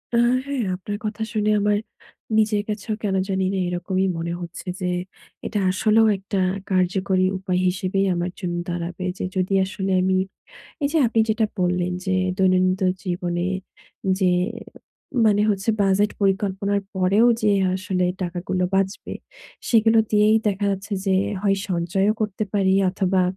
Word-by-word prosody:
আ - - +4 0.3
হ্যাঁ 280 -3 -2
আপনার 205 +3 -5
কথা 215 +1 -3
শুনে 215 0 +1
আমার 205 0 +2 0.6
নিজের 210 -1 +2
কাছেও 210 +1 -3
কেন 195 -2 0
জানিনা 190 0 0
এরকমই 185 +2 -1
মনে 170 +1 -3
হচ্ছে 175 +2 -8
যে 180 - 0 0.6
এটা 210 - -1
আসলেও 215 +3 +3
একটা 195 +1 -3 0.3
কার্যকরী 185 0 +2
উপায় 185 -1 -1
হিসেবেই 190 +1 0
আমার 175 +1 -2
জন্য 175 -3 -3
দাঁড়াবে। 175 +1 -4
যে - - -3
যদি 185 +1 0
আসলে 195 -1 -3
আমি, 190 0 +2 0.7
এই 280 - +2
যে 325 - +3
আপনি 225 0 +2
যেটা 220 0 +2 0.2
বললেন 180 0 +1
যে 190 - 0 0.2
দৈনন্দিন 185 0 +3 0.2
জীবনে 175 -1 -2 0.7
যে 185 -2 +3 1.0
মানে 205 -1 +4
হচ্ছে 200 +2 0
বাজেট 200 +2 +3
পরিকল্পনার 200 0 +1
পরেও 190 +5 +3 0.2
যে 210 -1 +4 0.2
আসলে 185 -1 -1 0.2
টাকাগুলো 180 +1 -2
বাঁচবে 195 +1 -1 0.5
,সেগুলো 225 -1 +4
দিয়েই 215 +1 +4
দেখা 205 0 -1
যাচ্ছে 195 +2 -4
যে 190 - +3 0.3
হয় 195 -1 +2
সঞ্চয়ও 185 +4 +1
করতে 210 0 -1
পারি 195 -2 +2 0.2
অথবা 190 0 +1
190 Hz, 140 wpm, -23 LUFS, 185-210 Hz, 1.0 s, আ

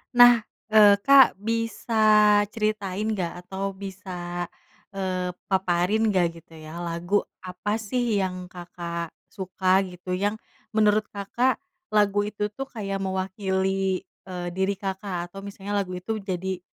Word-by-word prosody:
Nah, 245 -1 +9 0.3
eee, 210 -2 +8
Kak 275 -2 +7
bisa 230 +2 -2 0.5
ceritain 215 -2 -1
nggak 180 -3 -3
atau 195 +1 -4
bisa, 180 -3 -5 0.5
eee, 185 -2 -2 0.2
paparin 190 +3 +2
nggak, 175 -5 +1
gitu 165 - -21
ya, 155 +1 -9
lagu 175 +3 0 0.2
apa 185 +3 -3
sih 225 +1 -1
yang 185 -1 -3
Kakak 170 -2 -6 0.2
suka 190 0 +1
gitu, 180 0 -5
yang 205 +3 -1 0.3
menurut 215 -1 +3
Kakak 235 +6 0 0.3
lagu 205 -1 +3
itu 210 0 -2
tuh 270 +6 -6
kayak 200 -6 -4
mewakili, 190 0 0 0.3
eee, 180 -1 -4
diri 190 +1 +1
Kakak, 190 -2 -3
atau 195 +2 -10
misalnya 200 0 -5
lagu 185 - -10
itu 185 +5 -3
jadi, 190 -1 -3
190 Hz, 130 wpm, -25 LUFS, 180-210 Hz, 0.5 s, Nah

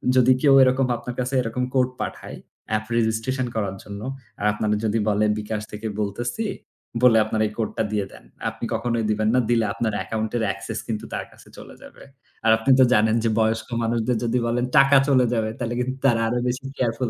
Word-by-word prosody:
যদি 130 0 +6
কেউ 140 -2 +5
এরকম 130 0 +2
আপনার 120 +1 -7
কাছে 125 +1 -2
এরকম 120 +2 -3
code 130 -1 +2
পাঠায়, - - -6 0.4
app 110 - -7
registration 120 +3 0
করার 100 -3 -2
জন্য, 100 0 -8 0.4
আর 105 - -2
আপনারে 105 0 0
যদি 110 +1 +1
বলে 105 +1 +2
বিকাশ 105 0 -4
থেকে 105 +1 -5
বলতেছি, 120 - -2 0.6
বলে 115 -3 +7
আপনার 110 0 -1
এই - - -7
code 110 -2 -1
টা - - +2
দিয়ে 105 -2 0
দেন। - - -14 0.3
আপনি - - -6
কখনোই 115 0 -1
দিবেন 110 +1 +1
না। - - +5
দিলে 115 -2 +3
আপনার 115 -2 -2
account-এর 110 +3 -2
access 100 +3 -6
কিন্তু 110 -2 -3
তার - - -3
কাছে - - -18
চলে - - -11
যাবে।" - - -14 0.4
আর 110 - +6
আপনি 115 +4 -3
তো - - +8
জানেন 110 0 +3
যে, 115 - +2
বয়স্ক 110 0 0 0.2
মানুষদের 115 +1 0
যদি 120 +2 0
বলেন 120 +1 0
টাকা 135 +1 +7
চলে 130 -3 +4
যাবে, 110 -2 0
তাহলে 120 -2 -3
কিন্তু 130 +1 -2
তারা 115 -4 +4
আরও 120 +2 0
বেশি 125 +2 -3
careful 120 0 0
115 Hz, 200 wpm, -23 LUFS, 110-125 Hz, 0.6 s, তো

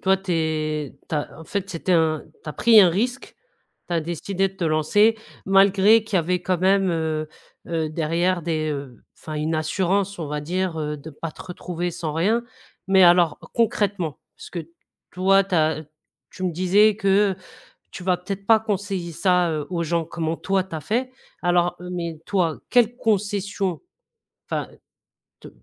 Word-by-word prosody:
toi, 190 0 +3
tu 190 -2 -4
es 155 -2 -2
tu - - -3
as 150 0 -4
en 160 - -10
fait 195 +1 -3
c'était 180 +1 -1
un 160 -2 +2 0.2
tu - - -9
as - - -3
pris 230 -2 +6
un 180 -3 +6
risque, 245 +8 -2 0.5
tu 175 - -1
as 165 - +2
décidé 180 +4 -1
de 190 - -20
te 185 - -3
lancer 165 +8 +3 0.3
malgré 200 +3 +5
qu'il 210 -3 -1
y - - +5
avait 180 +2 0
quand 185 -1 0
même, 190 0 +3
heu 160 -2 -2 0.4
heu, 160 -2 -1
derrière 170 +3 0
des, 155 -2 -1
heu, 140 -4 -6
enfin 155 - -8
une 155 +2 -1
assurance 185 +5 0
on 160 - -4
va 150 0 -3
dire, 175 +2 -2
heu, 150 -1 -3
de 150 +2 -10
pas 160 +3 -6
te - - -11
retrouver 175 -1 -4
sans 165 -3 -4
rien. 205 +9 +1 0.4
Mais 190 -1 +5
alors 175 -2 +5 0.2
concrètement, 200 -8 0 0.2
parce - - -11
que 165 -3 -6 0.4
toi, 195 +2 +4
tu 195 - -4
as 155 -1 +2
t 150 - -22 0.4
tu 185 - -10
me 180 - 0
disais 195 +5 +4
que, 200 0 +3
heu, - - -8 0.6
tu 180 - -8
vas 180 0 +2
peut-être 195 +2 -6
pas 225 -1 +6
conseiller 200 -5 -3
ça, 180 +1 +2
heu, 155 -2 -2
aux 170 -2 -1
gens, 170 0 0
comment 165 0 -3
toi 195 -1 0
tu 185 -3 -8
as - - -3
fait. 250 - -1 0.3
Alors, 175 0 +2
mais 175 -3 -5
toi, 180 -5 0
quelle 240 -1 +3
concession, 200 - -1 0.7
enfin, - - -3 0.7
te - - -11
180 Hz, 185 wpm, -23 LUFS, 160-195 Hz, 0.7 s, pris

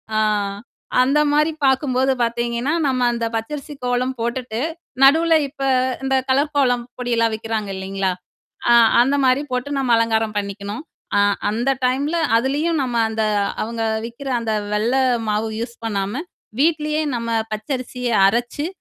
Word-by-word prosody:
ஆ. - - +3 0.8
அந்த 275 +4 +3
மாரி 300 +2 +3
பார்க்கும்போது 265 -1 +2
பாத்தீங்கன்னா, 235 +4 -1
நம்ம 255 -2 0
அந்தப் 230 -1 -3
பச்சரிசி 280 +6 -5
கோலம் 250 +1 0
போட்டுட்டு, 235 -1 -3 0.4
நடுவுல 325 +4 +6
இப்போ, 275 -1 -4 0.4
இந்தக் 265 -1 0
கலர் 280 +3 +2
கோலம் 245 -3 +2 0.2
பொடி 245 -1 -3
எல்லாம் 230 -1 +2
விக்கிறாங்க, 220 -2 -3
இல்லீங்களா? 190 0 -2 0.6
அ 235 - +7 0.3
அந்த 270 +3 +1
மாரி 255 +3 +3
போட்டு 250 +3 -2
நம்ம 255 -3 +1
அலங்காரம் 225 -1 0
பண்ணிக்கணும். 200 +3 -5 0.3
அ - - +5 0.3
அந்த 240 +5 0 0.2
டைம்ல 280 +6 0 0.2
அதுலயும் 290 +6 0
நம்ம 245 -2 -3
அந்த 220 0 -1 0.4
அவங்க 230 +1 -4 0.2
விக்கிற 240 +4 -8
அந்த 225 -2 -1 0.2
வெள்ளை 240 +5 +2 0.3
மாவு 210 +1 0
யூஸ் 235 0 -5
பண்ணாம, 205 +5 -2 0.4
வீட்டிலேயே 305 0 +1
நம்ம 230 0 -4 0.2
பச்சரிசியை 250 +1 -3
அரைச்சு, 240 +8 0
245 Hz, 135 wpm, -20 LUFS, 225-270 Hz, 0.8 s, அ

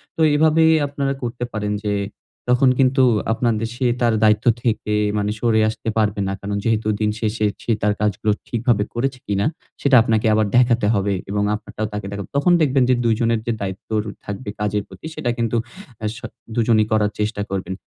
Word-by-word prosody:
তো - - -2
এভাবেই 160 +1 +4 0.2
আপনারা 140 -1 -2
করতে 120 0 -4
পারেন 105 -1 -2
যে 105 - +1 0.6
তখন 125 +2 +4
কিন্তু 130 0 +4 0.3
আপনাদের 115 -1 0
সে 125 +1 -2 0.2
তার 120 -1 +3
দায়িত্ব 105 0 +3 0.2
থেকে 110 -2 -1 0.2
মানে 105 0 0
সরে 115 -1 +2
আসতে 110 0 -4
পারবে 105 -2 +1
না। 95 - -2
কারণ 100 0 -3
যেহেতু 110 -1 0
দিন 105 0 +2
শেষে 110 -1 -1 0.2
সে - - -1
তার 105 0 +2
কাজগুলো 105 0 +1 0.2
ঠিকভাবে 115 -3 +1
করেছে 130 +2 -2
কিনা 100 0 0 0.4
সেটা 140 -2 +4
আপনাকে 110 -1 +1
আবার 110 0 +3
দেখাতে 120 -3 +3
হবে 100 -1 +1 0.2
এবং 105 +1 0
আপনারটাও 110 0 -5
তাকে 105 -1 -4
দেখাব। 100 0 -5
তখন 175 +5 +3
দেখবেন 135 -3 +3
যে 130 - +5
দুজনের 115 0 +2
যে 120 - 0
দায়িত্ব 95 -1 -5
র - - -15 0.2
থাকবে 105 +2 -6
কাজের 105 0 -1
প্রতি - - -13
সেটা 120 - -2
কিন্তু 115 0 0 0.4
অ্যা 110 - -3
স - - -9 0.4
দুজনই 110 -2 +3
করার 105 -1 +2
চেষ্টা 105 0 -1
করবেন। 95 -1 -3
110 Hz, 185 wpm, -21 LUFS, 105-120 Hz, 0.6 s, যে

